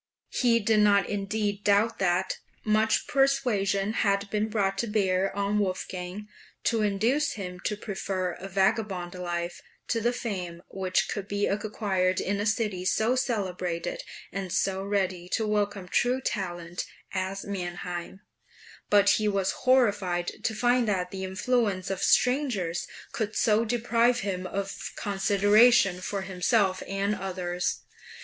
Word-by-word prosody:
He 235 -2 +3
did 215 0 +2
not 205 -1 +4
indeed 205 0 -2
doubt 210 +3 +3
that 185 0 +1 0.2
"much 215 +1 +2
persuasion 245 -8 +1
had 200 -2 +1
been 215 +1 0
brought 195 -3 0
to 235 - 0
bear 195 -3 +1
on 200 +1 +1
Wolfgang, 185 0 -3 0.4
to 230 -1 +1
induce 230 +9 +1
him 180 -3 -6
to 210 - -1
prefer 190 -3 -3
a 185 +3 -8
vagabond 190 -2 0
life 175 -1 -4 0.3
to 230 - +1
the 240 +2 +2
fame 180 -8 -5
which 190 0 0
could 200 -2 -4
be 205 0 0
acquired 195 -3 0
in 200 +1 -1
a 205 - 0
city 210 -4 0
so 220 +6 +2
celebrated, 185 -8 -2 0.3
and 195 -2 -4
so 190 +1 0
ready 190 -3 -1
to 220 - +1
welcome 205 -3 -1
true 245 +7 +2
talent, 175 -7 -4 0.3
as 190 +1 -3
Mannheim"; 180 -1 -5 0.7
but 205 -1 +5
he 215 - +1
was 195 -2 +1
horrified 205 -9 +2
to 220 - 0
find 245 +1 +2
that 180 -3 0
the 190 -1 -5
influence 195 -1 0
of 190 - -3
strangers 250 - +2 0.2
could 220 -1 -3
so 220 0 +3
deprive 235 +1 +2
him 185 -2 -3
of 195 +1 -4
consideration 205 0 +4
for 195 +1 -3
himself 190 +1 +1
and 195 +1 0
others. 180 -2 -2
200 Hz, 140 wpm, -27 LUFS, 185-220 Hz, 0.7 s, but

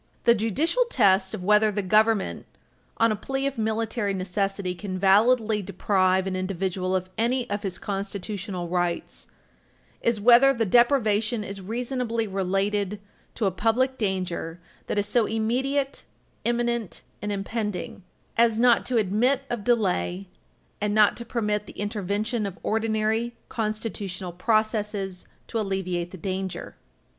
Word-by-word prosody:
The 235 - +6
judicial 270 - +1
test 195 - +3
of 180 - -7
whether 210 +2 +4
the 205 0 -2
Government, 215 +1 +2 0.5
on 230 0 +4
a - - +1
plea 270 +6 -3
of 275 -4 -2
military 220 -1 -1
necessity, 195 0 -2
can 185 +1 -5
validly 215 +3 +4
deprive 190 -1 +1
an 190 -1 -2
individual 185 0 -1
of 185 0 -1
any 245 +2 +1
of 205 0 -1
his 190 -3 -3
constitutional 195 -2 -4
rights 175 -1 -2 0.7
is 235 -2 +1
whether 245 +5 +6
the 230 -1 +1
deprivation 225 -1 +3
is 195 -1 -7
reasonably 230 +2 -2
related 195 +1 -1 0.4
to 225 - -1
a 195 - +2
public 245 +7 +1
danger 185 -5 -2 0.3
that - - -2
is 205 - +2
so 215 +1 +2
"immediate, 265 +6 -1 0.4
imminent, 235 -3 -1 0.2
and 210 - -2
impending" 205 -1 -3 0.4
as 230 -1 +4
not 240 -1 +4
to 250 - +1
admit 230 +7 +2
of 235 -4 -2
delay 195 -5 0 0.5
and 210 0 0
not 215 -1 +5
to 235 - -6
permit 210 -3 -1
the - - -10
intervention 205 +2 -1
of 195 - -8
ordinary 220 +1 0
constitutional 210 -4 -3
processes 210 -1 -1 0.2
to 230 - -3
alleviate 185 -4 -2
the 190 - -10
danger. 190 +1 -4
210 Hz, 135 wpm, -25 LUFS, 190-230 Hz, 0.7 s, The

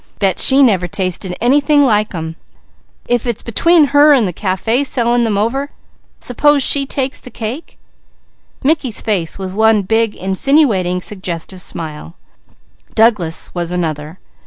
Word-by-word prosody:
Bet 195 -3 0
she 275 +1 +6
never 190 -8 +2
tasted 185 0 -4
any 265 +5 +3
like 275 -8 +2
them. 160 -2 -6 0.7
If 245 0 -1
it's 235 -3 -3
between 330 - +3
her 290 +1 +6
and 245 -7 +2
the 180 - -4
café 215 - -1
selling 240 -3 0
them 210 -3 -1
over, 265 +7 -1 0.5
s'pose 285 +3 +2
she 275 +1 +3
takes 270 -1 -3
the - - -12
cake?" 235 +7 -7 0.9
Mickey's 275 -6 0
face 190 -7 -2
was 190 -1 -6
one 220 0 +3
big 220 +2 0
insinuating, 190 - +1
suggestive 185 -2 -6
smile. 160 0 -7 0.8
Douglas' 210 -8 +1
was 175 -1 -3
another. 160 -2 -4
220 Hz, 135 wpm, -15 LUFS, 185-265 Hz, 0.9 s, she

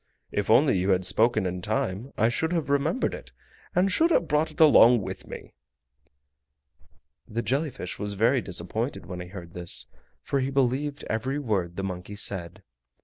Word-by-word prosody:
If - - -2
only 95 - +5
you 95 +2 0
had 95 -1 +2
spoken 110 +1 +2
in 90 0 -3
time 110 +4 -2
I 110 - +3
should 160 +8 -1
have 160 -5 -1
remembered 145 - +1
it, - - -9 0.4
and 190 +2 +3
should 325 - +3
have 175 - +2
brought 150 +1 +1
it 155 - -15
along 125 -7 +7
with - - -7
me!" - - -10 1.7
The 115 +1 -3
jelly 140 +8 0
fish 135 - -7
was 105 -1 -2
very 115 +5 +3
disappointed 100 +8 -4
when 90 +1 -7
he 90 - -7
heard 90 -2 -10
this, 90 -1 -3 0.4
for 140 - -1
he 130 0 -1
believed 135 +2 0
every 130 +6 -2
word 100 -11 -2
the 95 - -4
monkey 95 +1 -5
said. 95 -2 0
115 Hz, 175 wpm, -26 LUFS, 95-140 Hz, 1.7 s, along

